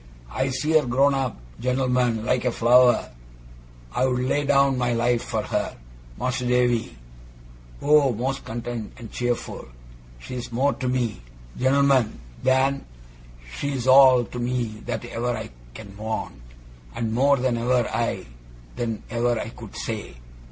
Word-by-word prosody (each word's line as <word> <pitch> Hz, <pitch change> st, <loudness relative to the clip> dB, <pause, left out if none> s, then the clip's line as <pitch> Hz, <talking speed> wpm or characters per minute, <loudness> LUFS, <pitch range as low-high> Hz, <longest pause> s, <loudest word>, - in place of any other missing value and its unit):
I 130 Hz, -, -1 dB
see 130 Hz, +4 st, -1 dB
her 155 Hz, -4 st, +4 dB
grown 135 Hz, +3 st, +3 dB
up 135 Hz, -3 st, -1 dB, 0.2 s
gent'lmen 125 Hz, -3 st, +1 dB
like 125 Hz, 0 st, +1 dB
a 125 Hz, -, +1 dB
flower. 120 Hz, +2 st, +4 dB, 0.8 s
I'd 130 Hz, -, +2 dB
lay 130 Hz, +3 st, 0 dB
down 140 Hz, -1 st, +4 dB
my 120 Hz, -1 st, +1 dB
life 120 Hz, 0 st, +1 dB
for 110 Hz, -3 st, -2 dB
her 105 Hz, 0 st, -2 dB, 0.4 s
Mas'r 125 Hz, 0 st, -2 dB
Davy 120 Hz, -, +1 dB, 0.9 s
Oh! 145 Hz, -2 st, +5 dB
most 130 Hz, +4 st, -3 dB
content 120 Hz, -1 st, -5 dB
and 115 Hz, -4 st, -10 dB
cheerful! 120 Hz, -1 st, -3 dB, 0.5 s
She's 120 Hz, -, -7 dB
more 135 Hz, +4 st, +2 dB
to 130 Hz, -, -4 dB
me 120 Hz, -, -1 dB, 0.3 s
gent'lmen 130 Hz, -3 st, +3 dB, 0.3 s
than 130 Hz, +1 st, +2 dB, 0.8 s
she's 135 Hz, -4 st, -2 dB
all 130 Hz, -1 st, +7 dB
to 125 Hz, -, -7 dB
me 120 Hz, -3 st, -2 dB
that -, -, -3 dB
ever 120 Hz, 0 st, -2 dB
I -, -, -7 dB, 0.2 s
can 100 Hz, +8 st, -10 dB
want, 110 Hz, -, -5 dB, 0.5 s
and 115 Hz, -1 st, -2 dB
more 140 Hz, +4 st, +4 dB
than 125 Hz, -1 st, 0 dB
ever 120 Hz, 0 st, +2 dB
I 115 Hz, -4 st, -1 dB, 0.5 s
than 115 Hz, -3 st, -3 dB
ever 120 Hz, -1 st, +1 dB
I -, -, -4 dB
could 115 Hz, -3 st, -11 dB
say. 110 Hz, -, -5 dB
125 Hz, 140 wpm, -24 LUFS, 115-130 Hz, 0.9 s, all